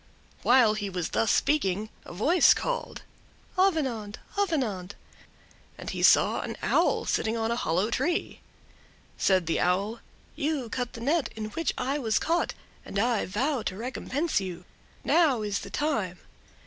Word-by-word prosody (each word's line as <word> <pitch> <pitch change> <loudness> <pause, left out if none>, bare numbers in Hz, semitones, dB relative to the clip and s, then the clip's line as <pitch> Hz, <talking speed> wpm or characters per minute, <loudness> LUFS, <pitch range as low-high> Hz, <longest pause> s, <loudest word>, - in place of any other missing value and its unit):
While 245 -3 +5
he 205 -2 -3
was 180 -3 -3
thus 225 - +1
speaking 215 -8 +1
a - - -10
voice 295 - +5
called: - - -3 0.5
"Avenant, 270 - +1 0.2
Avenant!"—and 250 - -5
he - - -4
saw - - +5
an - - -5
Owl - - +2
sitting 220 +1 0
on 225 0 -1
a - - +1
hollow 190 +1 0
tree. 320 +9 -1 0.8
Said 185 -3 +3
the 165 - 0
Owl: 200 +6 0 0.4
"You 285 -5 -2
cut 245 -1 -3
the 230 - -8
net 290 +5 +1
in 215 -1 -5
which 330 +7 -1
I 270 +3 -1
was 220 -5 +1
caught, 340 +1 0 0.3
and - - -6
I 230 +1 +1
vow 250 +8 0
to 190 - -4
recompense 260 +4 -1
you. 180 -2 -6 0.4
Now 290 -10 +3
is 205 -1 -1
the - - -8
time. 220 - -1
230 Hz, 150 wpm, -27 LUFS, 200-295 Hz, 0.8 s, While